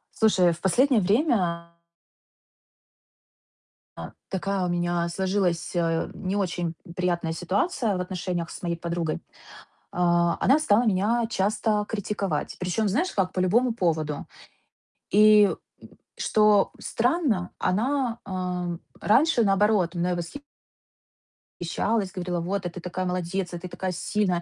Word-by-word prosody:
Слушай, 190 -6 +4
в 170 - -12
последнее 245 +6 +3
время 185 - +1 2.3
а, - - -7 0.2
такая 195 0 -1
у - - -1
меня 175 0 0
сложилась, 180 -2 -1
э, 165 -1 0
не 190 0 -3
очень 175 -4 -1 0.2
приятная 175 -2 -1
ситуация 200 - 0
в - - -2
отношениях 180 -2 -3
с - - -9
моей 170 -1 -1
подругой. 170 -1 -3 0.7
А, 175 -1 +2
она 275 +4 +5
стала 240 -5 +3
меня 220 +3 +2
часто 210 +1 0
критиковать. 200 -7 -3
Причём 185 +4 0
знаешь 290 - 0
как? 185 -2 0
По - - -2
любому 230 +7 +2
поводу. 160 -8 -1 0.9
И, 210 0 +7
м, - - -1 0.6
что 210 -2 +3
странно, 240 - 0
она, 240 +4 0
э, 180 -2 -3 0.2
раньше 270 +2 +4
наоборот 195 -3 +2
мной 175 +1 0 1.2
восхищалась, 195 +4 -2
говорила: 180 -1 -2
"Вот, 185 +3 -2
а - - -1
ты 175 - -9
такая 180 +1 -4
молодец! 180 0 -2
А - - -3
ты 180 - -7
такая 185 +1 -4
сильная! 180 0 -1
185 Hz, 125 wpm, -25 LUFS, 175-210 Hz, 2.3 s, И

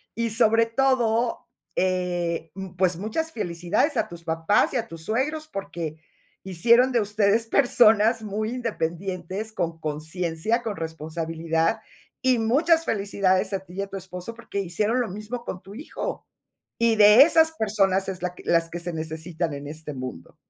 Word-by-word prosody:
Y 230 0 -1
sobre 225 0 +4
todo, 235 -1 +1 0.3
eh, 175 -3 -1
m 190 -1 -8
pues 180 -2 +2
muchas 270 - -2
felicidades 195 - -1
a 220 - +1
tus 170 -1 -11
papás 165 +9 +1
y - - +1
a 230 -1 -2
tus 165 -3 -9
suegros, 300 - -1
porque 170 - -5 0.5
hicieron 235 +8 +4
de 240 - +2
ustedes 210 +2 +2
personas 225 -3 +4
muy 215 +1 -3
independientes, 195 -2 -4
con 170 -4 -3
consciencia, 160 +8 -1
con 220 -3 -4
responsabilidad. 165 +2 -2 0.4
Y 255 -2 +3
muchas 320 +9 +3
felicidades 195 -2 +1
a 195 - 0
ti 180 - -13
y 195 - -2
a 200 - -3
tu 195 - -6
esposo, 180 +3 -7
porque 230 -3 -6
hicieron 210 +7 0
lo 230 - -2
mismo 215 +5 -6
con 185 - -5
tu 195 +2 -12
hijo. 290 +7 -6 0.5
Y 230 -1 +3
de 210 +3 +8
esas 320 0 +4
personas 195 -6 +1
es 185 -2 -6
la 180 -1 -2
que - - -13
las 165 -1 +2
que 175 - -5
se 175 +1 -3
necesitan 160 +1 -3
en 140 0 -7
este 150 0 -6
mundo. 130 -10 -8
195 Hz, 165 wpm, -25 LUFS, 170-230 Hz, 0.5 s, de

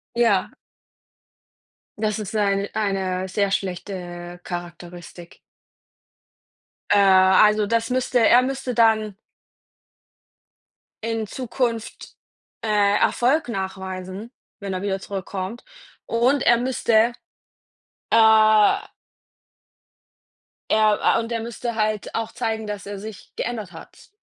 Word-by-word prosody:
Ja. 230 -5 +2 1.4
Das 215 -1 -1
ist 215 0 -6
seine 200 -2 0
eine 190 -3 -1
sehr 200 +1 0
schlechte 175 -2 -5
Charakteristik. 175 0 -9 1.5
Äh. 205 - +5
Also 195 +2 +5
das 230 +2 0
müsste 255 0 +1
er 245 +1 +6
müsste 260 -1 -3
dann 220 -3 +2 1.9
in 225 -1 -2
Zukunft, 235 -1 -4 0.5
äh, 205 -2 +2
Erfolg 265 +3 +1
nachweisen, 190 +2 -6 0.3
wenn 200 -1 -5
er 185 - -3
wieder 195 -1 -2
zurückkommt. 195 +3 -6 0.4
Und 245 +4 +2
er 240 - +5
müsste, 235 -2 +2 1.0
äh 220 - +5 1.9
er, 215 -1 +3 0.2
äh - - +2
und 230 - -6
er 230 - -1
müsste 235 +1 -5
halt 215 -1 -2
auch 225 0 -3
zeigen, 220 -1 -3
dass 205 -1 -6
er 200 0 -6
sich 215 -1 -10
geändert 220 -6 -4
hat. 165 - -14
210 Hz, 100 wpm, -22 LUFS, 190-230 Hz, 1.9 s, er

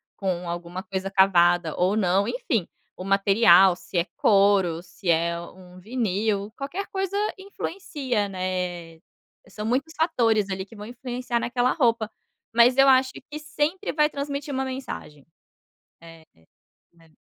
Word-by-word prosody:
com 180 -3 -3
alguma 175 +2 -5
coisa 190 0 -5
cavada, 175 -4 +3
ou 185 +4 +2
não, 195 0 +2
enfim, 240 -5 -1 0.3
o 185 - -8
material, 195 -1 +5
se 180 - -7
é 170 - 0
couro, 195 -5 +3
se 180 +1 -12
é 170 +1 +2
um 180 +1 -13
vinil, 210 -1 -1
qualquer 315 +9 -5
coisa 385 0 -3 0.2
influencia, 305 - -3
né, 180 -3 -4 0.5
são 210 0 -7
muitos 275 +7 -1
fatores, 225 - +1
ali, 190 0 -3
que 225 - -16
vão 210 0 -9
influenciar 245 0 -4
naquela 245 +1 0
roupa, 230 -6 +1 0.4
mas 235 +2 +5
eu 270 +1 +6
acho 260 0 +4 0.2
que 300 - -6
sempre 315 +5 -2
vai 300 0 +3
transmitir 280 0 -4
uma 265 0 -1
mensagem. 255 - -7 0.7
É, 165 -1 -15 0.7
né. 165 -2 -24
205 Hz, 140 wpm, -24 LUFS, 180-260 Hz, 0.7 s, eu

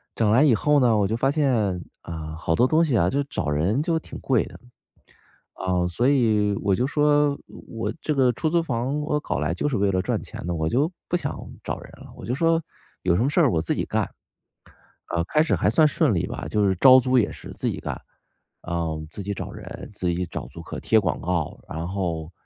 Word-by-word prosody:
整 110 -2 +2
来 125 +6 +5
以 140 -7 +5
后 150 +5 +3
呢， 120 -4 +4
我 100 -2 +2
就 110 - -1
发 135 +3 +1
现， 120 - +1 0.2
啊， 80 -1 -6
好 80 0 0
多 125 - +4
东 160 +5 +3
西 135 -8 +2
啊， 85 - +3
就 140 +8 +1
找 80 - -3
人 90 - +1
就 165 -1 +1
挺 - - -10
贵 130 -4 +2
的。 - - -12 1.0
啊， 90 -1 0
所 120 +9 +1
以， 110 -7 +3
我 100 -2 +2
就 125 - +1
说： 145 0 +3 0.3
“我 115 -1 -3
这 155 - -1
个 130 -2 +4
出 155 +7 -1
租 170 +1 +2
房 135 +1 -2
我 150 0 0
搞 110 - -3
来 75 +2 0
就 90 - -1
是 135 - -1
为 100 0 +2
了 95 -1 +1
赚 - - -1
钱 - - -8
的， 90 - -1
我 80 -1 -1
就 140 - +1 0.2
不 175 - +1
想 145 -5 -3 0.3
找 - - -3
人 - - -13
了。” - - -13
我 - - -10
就 125 - -1
说： 165 +2 +2 0.4
“有 90 -2 +2
什 110 - +2
么 130 - +2
事 160 - +2
儿 145 -7 +5
我 80 - +1
自 80 - -1
己 - - -1
干。” - - -1 1.1
呃， 85 - +1
开 150 - +2
始 160 - +1
还 - - +1
算 155 -2 +5
顺 150 -4 +2
利 85 - 0
吧， - - -6
就 105 -2 +2
是 95 - +1
招 130 +7 +8
租 130 0 +2
也 110 - +1
是 - - -10
自 - - -2
己 - - -3
干。 - - -4 0.7
嗯， 80 -3 -2
自 100 - -6
己 100 +1 -3
找 - - -6
人， - - -9
自 95 -3 -2
己 90 +1 0
找 - - -6
租 80 +7 -10
客、 - - -7
贴 110 - +3
广 95 - -1
告。 85 -3 -2
然 80 +2 -4
后， 85 -4 -3
110 Hz, 255 characters per minute, -24 LUFS, 90-145 Hz, 1.1 s, 招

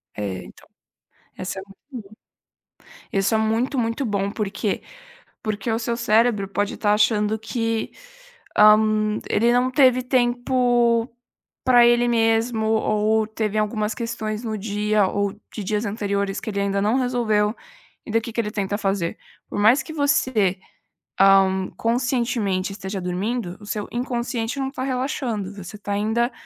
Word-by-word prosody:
É, 100 -3 -4
então, - - -16 0.7
essa 190 +1 -5
é - - -9
muito 200 +8 -19 0.2
boa. 215 - -18 1.0
Isso 195 +3 +1
é - - +4
muito, 225 +5 0
muito 230 +4 -1
bom, 200 -3 -1
por 210 -1 -2
quê? 200 +1 -2 0.6
Porque 215 +1 -2
o 225 - 0
seu 235 0 -2
cérebro 220 -3 +2
pode 205 +1 -2
estar 210 -1 +2
achando 210 0 +2
que, 225 0 -2 0.7
hã, 215 0 +5
ele 235 +3 +3
não 250 +1 +2
teve 255 -2 +4
tempo 245 -1 +2 0.5
para 245 -2 +6
ele 240 0 +4
mesmo 225 -1 +1
ou 220 0 +2
teve 215 -1 -2
algumas 215 0 -1
questões 225 -2 -4
no 220 -2 -3
dia, 210 0 +1
ou 200 0 -1 0.2
de 215 - -5
dias 210 +3 -1
anteriores, 200 -2 -2
que - - -6
ele 200 -2 -2
ainda 200 0 0
não 210 +4 +2
resolveu, 230 -4 +1 0.5
e - - -7
daí 225 - +3
o - - -10
que 230 - -7
que 230 - +1
ele 210 -2 -4
tenta 205 -2 -2
fazer? 195 -4 -1 0.3
Por - - -5
mais 225 +7 +5
que 315 - -9
você, 255 - +1 0.6
hã, 190 -1 +4
conscientemente 235 -5 0
esteja 195 -1 -5
dormindo, 185 +2 -3
o - - -11
seu 210 0 -4
inconsciente 240 0 -2
não 270 - -1
está 270 -1 -5
relaxando, 250 -6 -2
você 195 +1 -9
está 205 -1 -4
ainda 220 +4 0
220 Hz, 155 wpm, -23 LUFS, 205-240 Hz, 1.0 s, para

